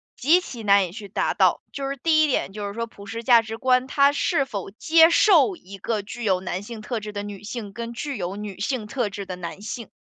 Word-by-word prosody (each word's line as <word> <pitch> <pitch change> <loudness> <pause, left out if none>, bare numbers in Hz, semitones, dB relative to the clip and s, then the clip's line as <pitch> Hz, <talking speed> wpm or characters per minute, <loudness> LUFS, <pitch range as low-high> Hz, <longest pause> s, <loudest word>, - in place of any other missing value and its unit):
极 320 +8 +4
其 245 -10 -8
难 200 -2 +4
以 - - -11
去 205 +1 -9
达 - - 0
到。 - - +3
就 275 -1 -3
是 275 - -4
第 310 +3 +3
一 - - +3
点 250 -8 -1
就 205 -1 -4
是 200 - -6
说 230 +1 -3
普 200 -2 -14
世 225 +3 -6
价 235 -1 +6
值 225 0 -7
观， 255 +1 +2
它 280 0 +4
是 275 -1 +1
否 200 -7 -5
接 325 +9 +5
受 370 0 +5
一 195 - -12
个 215 +2 -2
具 235 +4 -8
有 190 -4 +2
男 185 +1 -4
性 225 +1 -8
特 230 +1 -3
质 210 0 -6
的 205 -1 -5
女 205 -1 -8
性， 215 -2 -6
跟 235 +1 -5
具 275 +4 -4
有 185 0 -4
女 205 -2 -7
性 215 +1 -2
特 240 -2 -1
质 200 0 -6
的 185 - -6
男 180 +2 -7
性。 225 +1 -6
225 Hz, 275 characters per minute, -24 LUFS, 200-260 Hz, -, 价